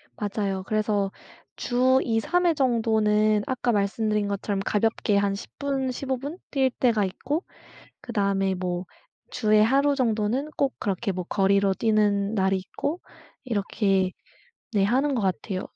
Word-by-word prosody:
맞아요. 200 - -2
그래서 210 -2 0 0.4
주 255 +2 +2
2-3 250 +11 +1
회 340 - +4
정도는 220 -5 +2
아까 250 -1 0
말씀드린 210 0 0
것처럼 200 0 -2
가볍게 210 -1 +1
한 200 0 +1
10 200 - -7
분 270 -2 -1
15 265 +1 -3
분 290 +7 -6
뛸 265 -2 +2
때가 230 -5 +3
있고 280 - -3 0.6
그다음에 200 -4 0
뭐 180 0 -3 0.5
주에 215 -2 +3
하루 275 +6 +3
정도는 240 +2 0
꼭 275 -2 +1
그렇게 200 +1 -1
뭐 185 -1 -4
거리로 195 0 +2
뛰는 210 -1 +1
날이 190 -1 +2
있고 285 - -4 0.4
이렇게 200 -4 0 0.6
네 205 -3 +2
하는 265 +8 +2
것 240 - 0
같아요. 190 0 -2
215 Hz, 255 characters per minute, -25 LUFS, 200-255 Hz, 0.6 s, 회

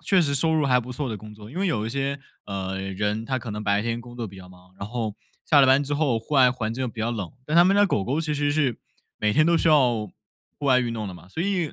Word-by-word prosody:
确 190 -2 +4
实 145 -4 +1
收 160 +4 +3
入 155 -2 +2
还 125 -2 +4
不 125 +1 -5
错 135 +2 -3
的 110 - -3
工 105 +1 -11
作， 105 +1 -12
因 145 - -11
为 195 - +1
有 110 - -1
一 - - -2
些， 140 +3 -2 0.2
呃， 95 -1 -4
人 105 +3 -2
他 130 +2 -1
可 120 - -7
能 105 0 -5
白 100 0 +2
天 115 +1 -2
工 120 0 -12
作 120 -2 -4
比 95 - -13
较 90 -1 -12
忙， 90 0 -19
然 100 - -5
后 110 -2 -4 0.3
下 145 -3 +6
了 135 - +6
班 135 +2 +5
之 145 +1 -2
后 145 -6 +1
户 115 +7 -6
外 130 -2 +6
环 115 -3 -3
境 130 +1 -2
比 115 0 -8
较 115 +2 0
冷， 105 -7 -4
但 155 - 0
他 175 - +8
们 190 +2 +4
家 205 0 +5
狗 105 - 0
狗 140 +8 -1
其 155 -2 -1
实 145 0 0
是 145 -6 0 0.4
每 105 0 +1
天 155 +5 +4
都 170 +1 +3
需 - - +2
要 125 -8 +3 0.5
户 145 - -4
外 130 -2 +5
运 120 -2 -1
动 110 -2 -4
的 95 - -6
嘛， 90 0 -14
所 160 - -4
以 180 -5 -1
125 Hz, 325 characters per minute, -24 LUFS, 105-145 Hz, 0.5 s, 他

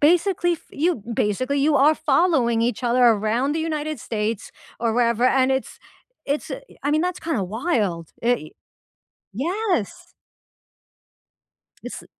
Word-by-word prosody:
basically 350 +3 +3
f 335 - -7
you 315 - 0
basically, 255 +7 0
you 295 +2 +3
are 290 +3 +5
following 270 -7 +2
each 240 +1 -1
other 245 +1 +3
around 230 +4 +3
the 320 - -1
United 310 -2 -3
States- 215 -1 -3 0.3
or 230 -1 0
wherever- 235 0 +2 0.2
and 260 +1 +3
it's 265 0 -2 0.4
it's 285 +2 -2
i - - -5 0.2
I 290 - +1
mean, 310 - +3
that's 360 +1 -1
kinda 315 -11 -2
wild, 200 - -1
i 235 -10 0 0.8
yes! 350 - -2 1.7
It's - - -7
a - - -17
265 Hz, 140 wpm, -23 LUFS, 230-315 Hz, 1.7 s, are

